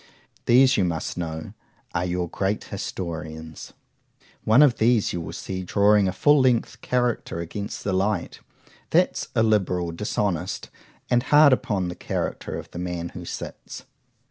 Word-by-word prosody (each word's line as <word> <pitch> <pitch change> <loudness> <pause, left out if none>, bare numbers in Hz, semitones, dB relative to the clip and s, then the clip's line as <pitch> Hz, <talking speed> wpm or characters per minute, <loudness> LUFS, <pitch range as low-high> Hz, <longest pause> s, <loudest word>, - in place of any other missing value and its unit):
—These, 130 +2 +6
you 100 - +3
must 85 -3 -2
know, 80 -2 -5 0.4
are 85 - 0
your 90 0 -1
great 95 +4 -2
historians. 80 -5 -6 0.7
One 115 +7 +6
of 140 -5 +4
these 115 -1 +2
you 85 - -3
will 80 - -6
see 95 -1 -5
drawing 100 +2 +3
a - - +1
full 145 +10 +4
length 120 -2 +1
character 125 -8 -1
against 100 +5 -5
the 100 - -1
light;—that's 100 +3 -2
illiberal,—dishonest,—and 95 +1 -1
hard 145 +1 +6
upon 95 -7 0
the 90 - -6
character - - -3
of - - -9
the 85 - -7
man 90 -1 -3
who - - -9
sits. - - -7
95 Hz, 135 wpm, -24 LUFS, 85-115 Hz, 0.7 s, These